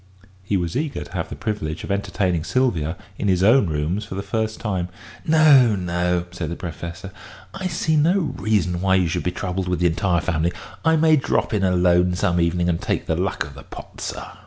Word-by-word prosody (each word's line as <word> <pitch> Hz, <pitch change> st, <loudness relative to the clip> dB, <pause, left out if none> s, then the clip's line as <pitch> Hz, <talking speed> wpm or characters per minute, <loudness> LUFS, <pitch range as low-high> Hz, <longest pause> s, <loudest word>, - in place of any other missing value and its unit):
He 95 Hz, +1 st, 0 dB
was 85 Hz, -2 st, -3 dB
eager 150 Hz, +1 st, -2 dB
to -, -, -14 dB
have -, -, -3 dB
the -, -, -6 dB
privilege 80 Hz, -7 st, -4 dB
of -, -, -4 dB
entertaining 95 Hz, -4 st, 0 dB
Sylvia 90 Hz, -, 0 dB, 0.2 s
in 105 Hz, -, -1 dB
his 95 Hz, -1 st, +2 dB
own 110 Hz, 0 st, +5 dB
rooms 80 Hz, +6 st, -1 dB
for 105 Hz, -3 st, -7 dB
the 100 Hz, -, -3 dB
first 110 Hz, +2 st, -2 dB
time. 95 Hz, -5 st, -2 dB, 0.4 s
"No, 145 Hz, -8 st, +6 dB
no," 90 Hz, -1 st, -1 dB
said 90 Hz, -4 st, -4 dB
the 85 Hz, -, -4 dB
Professor; 85 Hz, +2 st, -7 dB, 0.4 s
"I 190 Hz, -1 st, -3 dB
see 160 Hz, -2 st, 0 dB
no 165 Hz, +6 st, +4 dB
reason 105 Hz, -, 0 dB
why 95 Hz, 0 st, +3 dB
you 90 Hz, -2 st, +3 dB
should 85 Hz, +2 st, -1 dB
be 90 Hz, -, -1 dB
troubled 90 Hz, 0 st, -3 dB
with 90 Hz, -1 st, -1 dB
the 90 Hz, -, +1 dB
entire 85 Hz, +1 st, +1 dB
family. 85 Hz, -1 st, 0 dB, 0.3 s
I 160 Hz, 0 st, +4 dB
may 160 Hz, 0 st, +5 dB
drop 135 Hz, -, 0 dB
in 105 Hz, -2 st, +1 dB
alone 90 Hz, -1 st, +3 dB
some 90 Hz, -1 st, +1 dB
evening 85 Hz, +1 st, +1 dB
and 85 Hz, -1 st, 0 dB
take -, -, -1 dB
the -, -, 0 dB
luck -, -, -1 dB
of 70 Hz, -, -11 dB
the 70 Hz, -, -11 dB
pot, -, -, -11 dB
sir." -, -, -4 dB
90 Hz, 210 wpm, -22 LUFS, 85-110 Hz, 0.4 s, No